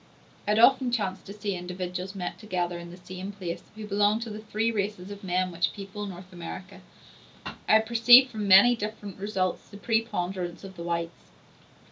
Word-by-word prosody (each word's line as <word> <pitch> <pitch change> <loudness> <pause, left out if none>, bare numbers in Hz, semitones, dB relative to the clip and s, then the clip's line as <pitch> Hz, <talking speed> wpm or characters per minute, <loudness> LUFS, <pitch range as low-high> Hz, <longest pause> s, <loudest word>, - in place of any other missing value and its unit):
I - - +2
had - - +2
often 255 +1 +5
chanced 195 -5 -2
to 200 - -7
see 205 -2 -3
individuals 180 +1 -5
met 180 -2 -5
together 175 -5 -2
in 170 0 -9
the 175 - -11
same 185 +2 -7
place, 185 -4 -5
who 215 0 -7
belonged 210 +2 +2
to 230 - -7
the 210 - -6
three 220 +1 -1
races 205 -3 -3
of 200 0 -9
men 185 0 0
which 170 +1 0
people 200 +1 -6
North 185 0 -10
America. 175 +2 -8 0.6
I - - -5
had 220 +1 +5
perceived 240 +3 +7
from 215 -2 -3
many 200 +6 +8
different 210 -3 -6
results 190 -3 -2
the 200 - -11
preponderance 190 -6 -2
of 190 -1 -10
the 170 - -9
whites. 170 0 -4
195 Hz, 185 wpm, -27 LUFS, 180-215 Hz, 0.6 s, many